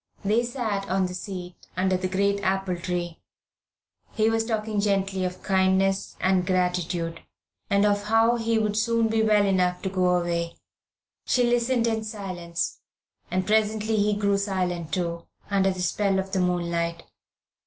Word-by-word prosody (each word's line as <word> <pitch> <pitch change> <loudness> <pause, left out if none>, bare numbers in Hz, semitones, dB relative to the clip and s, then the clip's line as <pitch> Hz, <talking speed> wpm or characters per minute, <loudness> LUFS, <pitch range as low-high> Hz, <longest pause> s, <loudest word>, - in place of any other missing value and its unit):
They 220 +4 +3
sat 225 -5 -3
on 190 0 +2
the 180 - -4
seat 180 -1 -7
under 185 0 +2
the 185 0 -1
great 200 +2 +1
apple 190 -1 0
tree. 175 -1 -4 0.9
He 220 0 +2
was 225 0 +1
talking 220 -2 -1
gently 195 -2 0
of 180 0 -5
kindness 190 0 +2
and 185 -1 +2
gratitude, 180 -2 -1 0.5
and 200 +1 +3
of 205 0 +1
how 225 +2 +4
he 230 0 +1
would 215 -1 0
soon 230 +1 +2
be 225 0 +2
well 210 -2 +4
enough 180 -2 +1
to 190 - -1
go 180 -1 +2
away. 170 -1 -2 0.7
She 250 - +3
listened 240 0 +2
in 225 -1 0
silence, 185 -6 -4 0.5
and 185 +1 0
presently 220 +1 +1
he 210 0 +2
grew 200 -1 +1
silent, 180 -4 -2
too, 170 -2 -2 0.2
under 195 -1 +3
the 185 -1 -2
spell 195 +2 +1
of 190 0 -2
the 190 - 0
moonlight. 170 -2 -1
195 Hz, 155 wpm, -25 LUFS, 180-215 Hz, 0.9 s, how